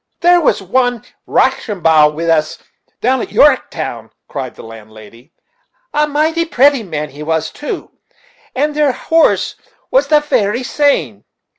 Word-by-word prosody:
"There 350 0 +5
was 215 -9 +1
one 245 +3 0 0.2
Roshambow 160 -7 +2
wid 165 +2 -3
us 155 -2 +1 0.4
down 255 +1 +1
at - - -4
Yorrektown," 285 -2 +1 0.2
cried 130 -3 -6
the - - -12
landlady 115 +4 -14 0.6
"a 300 0 +2
mighty 315 +3 0
pratty 280 -4 +3
man 150 -7 -5
he 145 +3 -11
was 160 +1 -2
too; 295 - -6 0.6
and 295 +3 0
their 295 -3 +2
horse 325 +6 +1 0.3
was - - +3
the 305 -1 +4
very 245 -5 0
same. 165 - 0
235 Hz, 135 wpm, -15 LUFS, -, 0.6 s, There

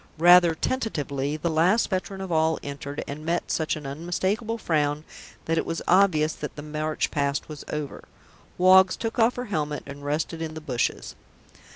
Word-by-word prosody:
Rather 175 0 +7
tentatively 150 - -2
the 155 - -2
last 175 +8 +3
veteran 190 +1 -3
of 190 -2 -5
all 160 0 +2
entered 140 0 -5
and 145 +2 -6
met 170 +2 -1
such 160 -1 0
an 150 -2 -8
unmistakable 185 - -2
frown 150 -6 0 0.4
that 165 0 +1
it - - 0
was 165 - -4
obvious 170 -5 +4
that - - -7
the 145 - -7
march 155 0 -2
past 140 -1 -1
was 150 -2 -8
over.... 150 -2 -5 0.5
Woggs 185 +1 +6
took 225 +1 -4
off 230 +2 +4
her 250 - -4
helmet 150 -8 -2
and 140 0 -9
rested 155 +3 -2
in 160 -1 -4
the - - -5
bushes. 130 -6 -2
160 Hz, 175 wpm, -25 LUFS, 150-185 Hz, 0.5 s, Rather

